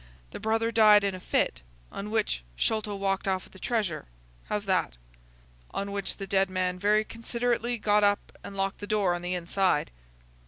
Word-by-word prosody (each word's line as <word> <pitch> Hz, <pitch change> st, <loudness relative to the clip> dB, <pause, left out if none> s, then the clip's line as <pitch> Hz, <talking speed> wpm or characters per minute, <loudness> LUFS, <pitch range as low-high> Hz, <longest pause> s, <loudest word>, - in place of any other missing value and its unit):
The -, -, -7 dB
brother 225 Hz, +1 st, +1 dB
died 215 Hz, -2 st, +7 dB
in 200 Hz, -1 st, 0 dB
a 185 Hz, -, -6 dB
fit, 60 Hz, -, 0 dB, 0.3 s
on 200 Hz, +1 st, -5 dB
which 215 Hz, -, 0 dB
Sholto 215 Hz, -, 0 dB
walked 195 Hz, 0 st, -1 dB
off 190 Hz, -1 st, 0 dB
with -, -, -18 dB
the 190 Hz, -, -13 dB
treasure. 205 Hz, -, -1 dB, 0.4 s
How's 210 Hz, 0 st, -2 dB
that?" 185 Hz, -, 0 dB, 0.8 s
"On 200 Hz, 0 st, -2 dB
which 200 Hz, -1 st, -3 dB
the 195 Hz, -, -5 dB
dead 195 Hz, -1 st, +2 dB
man 185 Hz, -1 st, -1 dB
very 210 Hz, +2 st, +3 dB
considerately 235 Hz, +1 st, -1 dB
got 210 Hz, -1 st, +3 dB
up 205 Hz, 0 st, +1 dB
and 195 Hz, -, -8 dB
locked 195 Hz, 0 st, -1 dB
the 205 Hz, -, -6 dB
door 205 Hz, -4 st, +2 dB
on 175 Hz, -, -3 dB
the 180 Hz, +1 st, -2 dB
inside." 180 Hz, -2 st, +1 dB
200 Hz, 185 wpm, -28 LUFS, 185-215 Hz, 0.8 s, died